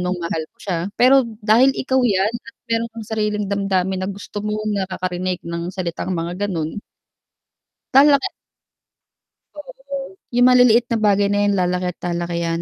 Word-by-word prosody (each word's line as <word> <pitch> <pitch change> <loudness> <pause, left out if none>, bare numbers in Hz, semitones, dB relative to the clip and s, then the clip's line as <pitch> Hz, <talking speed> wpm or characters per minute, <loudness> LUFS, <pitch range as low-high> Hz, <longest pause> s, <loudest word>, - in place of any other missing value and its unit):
mong 180 +1 -1
mahal 165 -1 -2
mo - - -52
siya 180 -4 -2 0.2
pero 260 0 +5 0.2
dahil 240 +5 +4
ikaw 260 0 +1
yan 210 -3 +2
at 240 +3 -9 0.2
mayro'n 230 0 0
kang 225 -2 -8
sariling 210 -1 -1
damdamin 190 -2 0
na 185 - -2
gusto 200 +1 -6
mong 215 0 -2
nakakarinig 185 -1 -3
ng 170 0 -4
salitang 185 0 -4
mga 175 +4 -3
gano'n 165 +2 -3 1.1
lalaki 280 +6 +6 1.3
oo, 275 +3 -8 0.2
yung 245 +1 +6
maliliit 245 -2 +5
na 230 - +1
bagay 205 -1 +3
na 205 - +1
yan 205 - +2
lalaki 180 -1 0
at - - -65
lalaki 170 0 -3
yan 165 0 -1
205 Hz, 155 wpm, -20 LUFS, 180-240 Hz, 1.3 s, lalaki